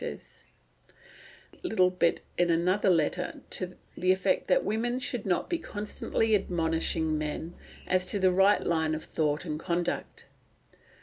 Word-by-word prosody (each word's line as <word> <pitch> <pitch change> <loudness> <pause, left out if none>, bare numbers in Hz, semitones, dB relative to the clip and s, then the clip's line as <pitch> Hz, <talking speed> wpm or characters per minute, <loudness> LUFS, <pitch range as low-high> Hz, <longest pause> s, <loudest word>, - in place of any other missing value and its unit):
There - - -2
is - - -17 1.1
a - - -19
funny 360 - -4
little 185 -4 +3
bit 175 -2 +1
in 175 0 +2
another 180 +4 +2
letter 180 +1 0
to 185 -1 -3 0.2
the 185 +1 +2
effect 340 - +1
that - - +3
women 240 +3 0
should 245 -4 -3
not 180 - +1
be 340 - -1
constantly 215 -2 -2
admonishing 165 -4 +1
men 155 +2 -4 0.3
as 185 0 +1
to 205 - 0
the 190 -1 +3
right 195 +3 +4
line 160 -2 +1
of 155 - -5
thought 150 +1 -1
and 155 -2 -3
conduct. 175 0 -3
180 Hz, 160 wpm, -29 LUFS, 165-205 Hz, 1.1 s, right